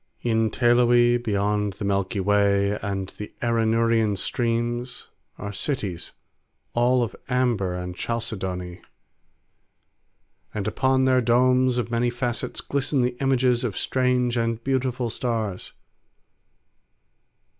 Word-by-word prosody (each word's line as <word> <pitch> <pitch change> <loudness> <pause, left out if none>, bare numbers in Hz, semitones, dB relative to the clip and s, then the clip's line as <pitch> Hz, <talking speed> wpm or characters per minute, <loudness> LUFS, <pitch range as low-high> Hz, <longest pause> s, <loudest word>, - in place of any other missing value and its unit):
In 115 -2 +2
Teloe 120 0 +4
beyond 105 -1 0
the 100 +2 -6
Milky 100 0 0
Way 100 0 +2
and 100 -2 -3
the 105 - -6
Arinurian 115 -2 +2
streams 120 +2 -2 0.3
are 105 0 -6
cities 100 - -2 0.6
all 120 +1 +3
of 115 - -4
amber 120 -8 +1
and 90 0 -5
chalcedony. 95 -6 -4 1.7
And 105 -2 -2
upon 130 0 +2
their 130 -1 +4
domes 125 +1 +3
of 120 -1 -2
many 120 +1 +1
facets 120 -1 -2
glisten 140 -1 0
the 125 0 -1
images 130 -2 +2
of 110 -6 -3
strange 125 -2 +1
and 115 0 -1
beautiful 130 -2 -1
stars. 110 -6 -3
115 Hz, 110 wpm, -24 LUFS, 105-125 Hz, 1.7 s, Teloe